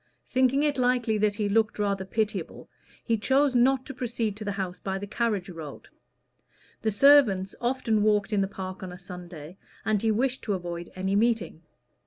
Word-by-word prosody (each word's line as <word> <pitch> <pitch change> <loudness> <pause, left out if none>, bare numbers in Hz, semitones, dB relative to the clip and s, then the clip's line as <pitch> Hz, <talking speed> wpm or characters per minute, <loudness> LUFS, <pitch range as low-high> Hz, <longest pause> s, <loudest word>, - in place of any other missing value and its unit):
Thinking 260 +2 +2
it 290 -3 +1
likely 245 -3 +2
that 210 -1 +2
he 210 -1 -1
looked 220 +2 +1
rather 200 -2 -1
pitiable, 205 -3 -3 0.4
he 225 -2 0
chose 270 +4 +2
not 255 +1 +3
to 275 - -7
proceed 235 -4 -2
to 215 - -6
the 205 -1 -2
house 185 -2 -4
by 190 -1 -3
the 200 - -5
carriage 210 -3 -1
road. 160 -6 -9 0.9
The 220 - 0
servants 205 -6 +5
often 240 -3 +1
walked 210 0 +2
in 200 - +2
the 195 - +1
park 185 -1 -7
on 185 -1 -6
a 180 - -9
Sunday, 180 -2 -10 0.3
and 215 -2 +1
he 225 - +1
wished 250 +4 0
to 210 - 0
avoid 175 -1 -6
any 190 +1 -1
meeting. 225 -6 +1
210 Hz, 185 wpm, -27 LUFS, 190-240 Hz, 0.9 s, servants